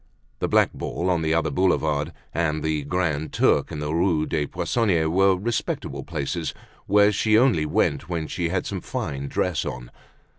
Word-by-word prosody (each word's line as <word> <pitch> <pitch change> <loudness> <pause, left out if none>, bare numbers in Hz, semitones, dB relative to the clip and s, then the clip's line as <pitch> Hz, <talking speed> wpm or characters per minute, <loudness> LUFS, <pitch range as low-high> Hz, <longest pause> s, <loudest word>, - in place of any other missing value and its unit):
The - - 0
"Black - - +3
Ball" 90 +2 -2
on 85 -2 +1
the 80 0 +1
outer 80 -2 +1
Boulevard 80 -3 +1 0.2
and 75 -2 0
the 80 -1 0
"Grand 80 -2 -1
Turk" - - +2
in - - -5
the 75 +1 -2
Rue 85 -2 +2
des 75 -3 -1
Poissonniers, 95 -9 +1
were 95 +2 +4
respectable 115 +4 -3
places 80 +1 -3 0.3
where 105 +1 +5
she 110 +2 +3
only 110 - +3
went 75 +1 0
when 85 -3 -2
she 85 +2 -2
had 90 +1 -1
some 95 -3 -4
fine 70 -2 -4
dress 85 +2 -1
on. 60 -1 -6
85 Hz, 175 wpm, -24 LUFS, 75-95 Hz, 0.3 s, where